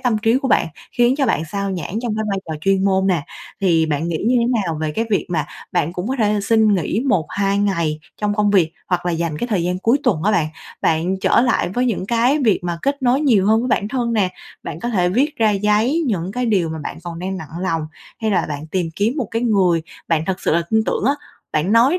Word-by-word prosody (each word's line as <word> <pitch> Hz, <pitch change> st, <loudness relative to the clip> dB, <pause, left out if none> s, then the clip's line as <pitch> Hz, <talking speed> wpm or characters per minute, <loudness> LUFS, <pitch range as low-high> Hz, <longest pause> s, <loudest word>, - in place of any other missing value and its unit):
tâm 235 Hz, -4 st, +1 dB
trí 225 Hz, +3 st, +2 dB
của 265 Hz, -1 st, -2 dB
bạn, -, -, +3 dB, 0.3 s
khiến 240 Hz, +2 st, +3 dB
cho 275 Hz, -, +1 dB
bạn 225 Hz, -, +1 dB
xao 200 Hz, +4 st, -3 dB
nhãng 185 Hz, +3 st, -3 dB
trong 230 Hz, -3 st, -1 dB
cái 220 Hz, -, -1 dB
vai 195 Hz, -, -1 dB
trò 160 Hz, -, -3 dB
chuyên 195 Hz, +2 st, +2 dB
môn 190 Hz, -1 st, +2 dB
nè. 170 Hz, -6 st, +1 dB, 0.4 s
Thì 165 Hz, -4 st, +3 dB
bạn 155 Hz, +2 st, -1 dB
nghĩ 165 Hz, -, -1 dB
như 250 Hz, -, +3 dB
thế 235 Hz, -, +2 dB, 0.2 s
nào 165 Hz, -3 st, -2 dB
về 155 Hz, -1 st, -1 dB
cái 225 Hz, -, -1 dB
việc 200 Hz, -, +1 dB
mà 155 Hz, -4 st, -1 dB, 0.3 s
bạn 165 Hz, +4 st, 0 dB
cũng 180 Hz, +5 st, -4 dB
có 265 Hz, -, -1 dB
thể 210 Hz, -2 st, +2 dB
là 205 Hz, -, 0 dB
xin 215 Hz, 0 st, +3 dB
nghỉ 190 Hz, +4 st, 0 dB
1-2 195 Hz, +3 st, +1 dB
ngày 170 Hz, -7 st, 0 dB, 0.2 s
trong 210 Hz, -1 st, 0 dB
công 210 Hz, -1 st, +2 dB
việc 175 Hz, -5 st, +3 dB, 0.2 s
hoặc 180 Hz, -1 st, 0 dB
là 175 Hz, -, +1 dB
dành 165 Hz, -2 st, -2 dB
cái 240 Hz, -, -2 dB
thời 200 Hz, -8 st, 0 dB
gian 180 Hz, +1 st, -1 dB
cuối 230 Hz, +8 st, +2 dB
tuần 160 Hz, -5 st, +1 dB
á 215 Hz, -, +2 dB
bạn, 170 Hz, -7 st, +2 dB, 0.4 s
bạn 170 Hz, +4 st, +1 dB
trở -, -, +4 dB
lại 240 Hz, -7 st, +1 dB
với 245 Hz, +7 st, 0 dB
những 195 Hz, -5 st, -1 dB
cái 240 Hz, +5 st, +2 dB
việc 215 Hz, -4 st, +3 dB
mà 170 Hz, -1 st, -2 dB
kết 280 Hz, 0 st, -1 dB
nối 255 Hz, +2 st, +3 dB
nhiều 225 Hz, -10 st, +3 dB
hơn 220 Hz, +1 st, +4 dB
với 250 Hz, -, -2 dB
bản 205 Hz, -2 st, +1 dB
thân 240 Hz, -1 st, -1 dB
nè, 195 Hz, -5 st, +2 dB, 0.3 s
bạn 160 Hz, -, -6 dB
có 240 Hz, -, -2 dB
thể 180 Hz, -6 st, +2 dB
viết 275 Hz, +10 st, +1 dB
ra 220 Hz, -2 st, +4 dB
giấy 210 Hz, +10 st, +2 dB
những 190 Hz, -4 st, -1 dB
cái 250 Hz, +2 st, -1 dB
điều 190 Hz, -7 st, +2 dB
mà 160 Hz, 0 st, -5 dB
bạn 150 Hz, -, -6 dB
còn 170 Hz, -1 st, -6 dB
đang 190 Hz, +1 st, -3 dB
nặng 165 Hz, 0 st, -8 dB
lòng, 165 Hz, -4 st, -1 dB, 0.3 s
hay 220 Hz, -1 st, 0 dB
là 190 Hz, -, +1 dB
bạn 150 Hz, +1 st, -5 dB
tìm 175 Hz, +1 st, -1 dB
kiếm 215 Hz, +5 st, +1 dB
một 245 Hz, -8 st, -2 dB
cái 230 Hz, +1 st, -1 dB
người 185 Hz, -8 st, +2 dB, 0.3 s
bạn 160 Hz, -1 st, +1 dB
thật 190 Hz, -1 st, -2 dB
sự -, -, +1 dB
là 170 Hz, -, +2 dB
tin 220 Hz, 0 st, +3 dB
tưởng -, -, -1 dB
á, 275 Hz, -, +4 dB, 0.4 s
bạn 165 Hz, +7 st, +1 dB
nói 260 Hz, +10 st, +5 dB
200 Hz, 260 wpm, -20 LUFS, 170-230 Hz, 0.4 s, nói